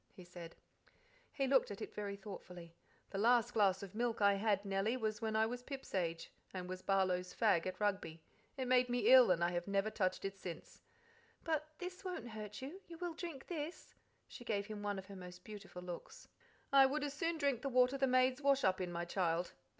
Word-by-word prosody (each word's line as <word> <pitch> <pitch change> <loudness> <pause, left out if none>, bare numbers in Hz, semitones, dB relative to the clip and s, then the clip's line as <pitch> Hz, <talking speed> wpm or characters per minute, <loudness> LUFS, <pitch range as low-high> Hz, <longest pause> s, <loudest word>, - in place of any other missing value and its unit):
he 185 - -11
said. 175 -1 -10 0.8
He 275 - 0
looked 265 -1 +4
at 205 - -6
it - - -6
very 200 -1 -4
thoughtfully. 180 -4 -9 0.4
"The 195 - -3
last 240 +2 +4
glass 195 -3 +3
of 195 - -8
milk 235 +1 -1
I 200 -1 +5
had, 200 0 +1
Nellie, 200 +5 0
was 215 -1 -2
when 220 -1 -1
I 220 0 +4
was 245 +2 -4
Pip's 270 +1 -8
age, 170 -3 -1 0.2
and 180 -1 -4
was 185 0 -5
Barlow's 185 -2 +1
fag 195 -7 +3
at 185 0 -5
Rugby. 195 -6 -1 0.4
It 260 -1 -2
made 250 0 +4
me 245 +1 +3
ill, 255 -5 +9
and 170 -2 +3
I 170 - +2
have 175 +1 -2
never 200 +2 +1
touched 185 -2 0
it 195 0 -4
since." 175 -3 -8 0.6
"But 310 -2 -1
this 365 +1 -7
won't 355 - -4
hurt 215 +1 -7
you. 330 +9 -7
You 335 - -9
will 350 0 -3
drink 320 -5 -6
this?" 330 -1 -6 0.3
She - - -10
gave 205 -3 -1
him 210 0 -6
one 205 -1 -2
of 190 - -6
her 200 0 -10
most 180 -1 -10
beautiful 200 -4 -9
looks. 175 -1 -8 0.5
"I 270 -1 +8
would 290 +2 -1
as 290 -1 -2
soon 330 +3 -1
drink 280 -6 +1
the 275 - -2
water 250 +1 +4
the 270 -1 +2
maids 255 +1 +3
wash 275 -1 +3
up 185 0 +2
in, 180 -1 -2
my 170 0 -3
child." 175 -1 0
210 Hz, 215 wpm, -37 LUFS, 185-260 Hz, 0.8 s, ill